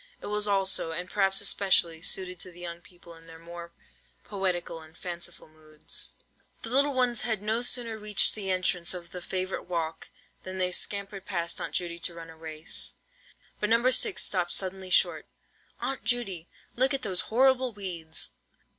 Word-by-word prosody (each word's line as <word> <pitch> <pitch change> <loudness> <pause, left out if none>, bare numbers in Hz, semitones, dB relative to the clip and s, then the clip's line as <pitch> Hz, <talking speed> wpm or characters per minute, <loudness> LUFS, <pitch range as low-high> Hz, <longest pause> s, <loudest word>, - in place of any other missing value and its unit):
It - - -9
was 210 0 0
also, 195 -4 +2
and 180 +2 -4
perhaps 195 0 +2
especially, 190 -5 +2
suited 180 0 0
to 185 - -6
the 175 - -14
young 170 -1 -6
people 175 -2 -15
in 165 0 -16
their 165 0 -11
more 170 +1 -9 0.5
poetical 180 -4 -2
and 160 +1 -15
fanciful 175 -1 -6
moods. 155 -1 -3 0.5
The 230 - -5
little 280 +2 +4
ones 245 -3 +4
had 220 -3 +1
no 220 +2 +1
sooner 240 -3 0
reached 210 -1 +4
the 200 -3 -3
entrance 185 -1 +2
of 175 -1 -8
the 180 - -6
favourite 185 +1 -3
walk, 165 -2 -3 0.3
than 185 0 -6
they 180 -1 +1
scampered 195 +1 -2
past 170 -3 -2
Aunt - - -4
Judy 170 -1 -2
to 170 0 -3
run 165 -1 -8
a - - -13
race; 160 0 -1 0.6
but 210 - 0
No. 235 +3 +5
6 405 - +3
stopped 180 -3 +1
suddenly 190 0 -1
short. - - +3 0.5
"Aunt 270 -1 -3
Judy, 195 -9 0 0.3
look 265 +3 +4
at 265 - -3
these 185 -4 0
horrible 260 +1 +4
weeds! 175 -6 -2
185 Hz, 175 wpm, -29 LUFS, 170-210 Hz, 0.6 s, No